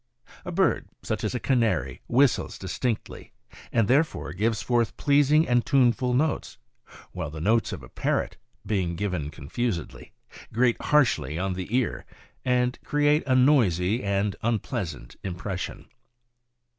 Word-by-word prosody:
A -, -, -5 dB
bird, -, -, +1 dB
such -, -, -3 dB
as -, -, -1 dB
a -, -, -1 dB
canary, 110 Hz, -, 0 dB
whistles 130 Hz, +1 st, +2 dB
distinctly, 105 Hz, +5 st, -4 dB, 0.4 s
and 115 Hz, -3 st, +2 dB
there 140 Hz, +7 st, +5 dB
fore 160 Hz, -, -7 dB
gives 110 Hz, +4 st, 0 dB
forth 120 Hz, -2 st, 0 dB
pleasing 145 Hz, +2 st, +4 dB
and 120 Hz, -1 st, +3 dB
tuneful 125 Hz, 0 st, +2 dB
notes, 155 Hz, +3 st, -1 dB, 0.5 s
while 90 Hz, -4 st, -4 dB
the 80 Hz, +1 st, -8 dB
notes 110 Hz, +7 st, +2 dB
of -, -, -6 dB
a -, -, -10 dB
parrot, -, -, -1 dB, 0.3 s
being 95 Hz, -5 st, -1 dB
given 90 Hz, -5 st, -2 dB
confusedly, 85 Hz, -, -4 dB, 0.4 s
grate 120 Hz, +1 st, +2 dB
harshly 125 Hz, -, +2 dB
on 95 Hz, +1 st, -1 dB
the 90 Hz, 0 st, -5 dB
ear, 130 Hz, -, -1 dB, 0.4 s
and 125 Hz, 0 st, +1 dB
create 150 Hz, +1 st, +2 dB
a 130 Hz, -, +3 dB
noisy 115 Hz, -, +3 dB
and 100 Hz, 0 st, 0 dB
unpleasant 100 Hz, -, -3 dB
impression. 95 Hz, 0 st, -5 dB
115 Hz, 135 wpm, -26 LUFS, 95-125 Hz, 0.5 s, there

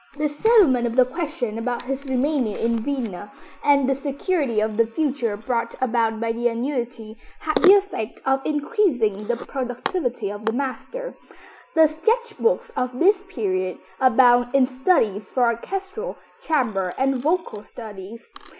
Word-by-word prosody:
The 300 Hz, 0 st, +1 dB
settlement 295 Hz, -, +4 dB
of 230 Hz, -, -4 dB
the 255 Hz, -1 st, +6 dB
question 265 Hz, -5 st, -4 dB
about 240 Hz, +1 st, -2 dB
his 270 Hz, +2 st, -4 dB
remaining 260 Hz, -3 st, 0 dB
in 230 Hz, 0 st, 0 dB
Vienna, 220 Hz, -7 st, -4 dB, 0.3 s
and 280 Hz, -2 st, +4 dB
the 270 Hz, -, +3 dB
security 280 Hz, -, -1 dB
of 215 Hz, 0 st, -1 dB
the 230 Hz, +1 st, +3 dB
future 250 Hz, -4 st, -1 dB
brought 235 Hz, +1 st, -2 dB
about 230 Hz, -3 st, +1 dB
by 230 Hz, 0 st, 0 dB
the 235 Hz, +1 st, 0 dB
annuity, 235 Hz, -2 st, -4 dB, 0.2 s
had 310 Hz, -1 st, +1 dB
the 385 Hz, 0 st, +9 dB
effect 390 Hz, -, -2 dB
of 270 Hz, 0 st, +1 dB
increasing 280 Hz, -, 0 dB
the 240 Hz, 0 st, 0 dB
productivity 245 Hz, -, -3 dB
of 205 Hz, +1 st, -8 dB
the 220 Hz, -, +1 dB
master. 280 Hz, -, -4 dB, 0.6 s
The 320 Hz, 0 st, +7 dB
sketch 440 Hz, +10 st, 0 dB
books 470 Hz, +2 st, +1 dB
of 250 Hz, -1 st, -2 dB
this 390 Hz, +5 st, +3 dB
period 185 Hz, -, -2 dB, 0.2 s
abound 245 Hz, 0 st, +4 dB
in 270 Hz, -2 st, +6 dB
studies 255 Hz, -, +1 dB
for 255 Hz, -, +1 dB
orchestral, 385 Hz, -, -2 dB, 0.2 s
chamber 220 Hz, -, 0 dB
and 265 Hz, 0 st, +1 dB
vocal 310 Hz, -, -1 dB
studies. 215 Hz, 0 st, -10 dB
255 Hz, 150 wpm, -23 LUFS, 230-300 Hz, 0.6 s, the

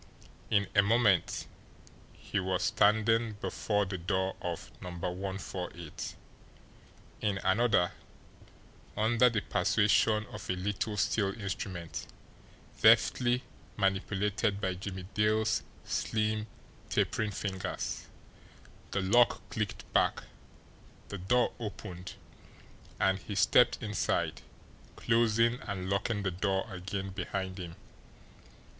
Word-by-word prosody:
In 100 Hz, -2 st, +3 dB
a 100 Hz, -, +6 dB
moment 105 Hz, -3 st, +3 dB, 0.7 s
he 100 Hz, -, -3 dB
was 95 Hz, -1 st, 0 dB
standing 110 Hz, +3 st, +3 dB
before 105 Hz, 0 st, -1 dB
the 95 Hz, -1 st, -4 dB
door 95 Hz, +2 st, 0 dB
of 85 Hz, -1 st, -4 dB
No. 90 Hz, -, -6 dB
148; 90 Hz, -2 st, -5 dB, 1.1 s
in 100 Hz, -2 st, +1 dB
another, 95 Hz, -3 st, +3 dB, 1.1 s
under 115 Hz, +3 st, +4 dB
the 110 Hz, -3 st, 0 dB
persuasion 105 Hz, +3 st, +3 dB
of -, -, -8 dB
a -, -, +2 dB
little 105 Hz, +3 st, -2 dB
steel 100 Hz, +1 st, +1 dB
instrument, 95 Hz, -4 st, -4 dB, 0.7 s
deftly 125 Hz, 0 st, +5 dB, 0.3 s
manipulated 100 Hz, +1 st, +1 dB
by 95 Hz, -2 st, 0 dB
Jimmie 95 Hz, 0 st, -6 dB
Dale's 110 Hz, +1 st, +2 dB, 0.2 s
slim, 110 Hz, 0 st, 0 dB, 0.4 s
tapering 110 Hz, -1 st, +1 dB
fingers, 95 Hz, -2 st, -4 dB, 0.8 s
the 100 Hz, -, -1 dB
lock 120 Hz, +6 st, +3 dB
clicked 110 Hz, -2 st, -4 dB
back, -, -, +2 dB, 0.9 s
the 100 Hz, -, -5 dB
door 120 Hz, +7 st, +2 dB
opened, 95 Hz, -5 st, -7 dB, 0.8 s
and 95 Hz, 0 st, +3 dB
he 100 Hz, -, -6 dB
stepped 115 Hz, +4 st, +5 dB
inside, 105 Hz, -3 st, -1 dB, 0.5 s
closing 115 Hz, +1 st, +3 dB
and 95 Hz, -2 st, -3 dB
locking 105 Hz, +1 st, 0 dB
the 95 Hz, -, 0 dB
door 95 Hz, +2 st, 0 dB
again 95 Hz, +1 st, -4 dB
behind 95 Hz, 0 st, -4 dB
him. 85 Hz, -2 st, -7 dB
100 Hz, 100 wpm, -31 LUFS, 95-110 Hz, 1.1 s, a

